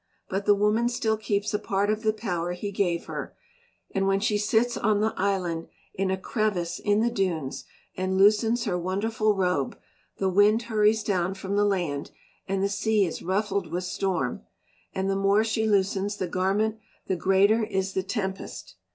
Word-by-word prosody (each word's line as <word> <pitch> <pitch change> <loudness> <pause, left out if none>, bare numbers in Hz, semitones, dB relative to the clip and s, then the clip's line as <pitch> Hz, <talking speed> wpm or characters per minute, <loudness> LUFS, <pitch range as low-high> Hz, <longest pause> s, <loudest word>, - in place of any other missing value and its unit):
But 195 +2 -2
the 205 - +6
woman 210 +4 +2
still 240 -3 0
keeps 205 -1 -1
a 210 - +1
part 200 +1 0
of 215 0 -2
the 220 -1 +2
power 180 -6 -3
he 200 +3 -5
gave 175 -4 0
her, - - -6 0.6
and 195 0 0
when 195 0 +2
she 210 +1 +1
sits 220 +3 +2
on 210 -1 +1
the 220 +1 +1
island 185 -4 -1 0.3
in 195 0 -1
a 190 - 0
crevice 190 -3 -1
in 205 0 +2
the 235 +1 +2
dunes 175 - -2 0.3
and 185 0 -1
loosens 215 +4 +4
her 180 -6 -1
wonderful 210 +4 0
robe, 180 -8 0 0.4
the 195 - 0
wind 205 +4 +4
hurries 215 -1 +2
down 185 -2 0
from 195 +1 -4
the 205 0 +3
land, 175 -8 -1 0.4
and 195 0 0
the - - +3
sea 205 +1 +1
is 170 - -5
ruffled 195 -2 -1
with 180 +2 -2
storm; 180 - -2 0.5
and 190 0 -2
the 195 - +1
more 195 +2 +3
she 220 0 0
loosens 200 0 +1
the 185 - -2
garment 200 +5 0 0.3
the 190 - 0
greater 195 +5 +3
is 190 -2 -2
the 190 - 0
tempest. 190 -1 -5
200 Hz, 180 wpm, -26 LUFS, 190-215 Hz, 0.6 s, the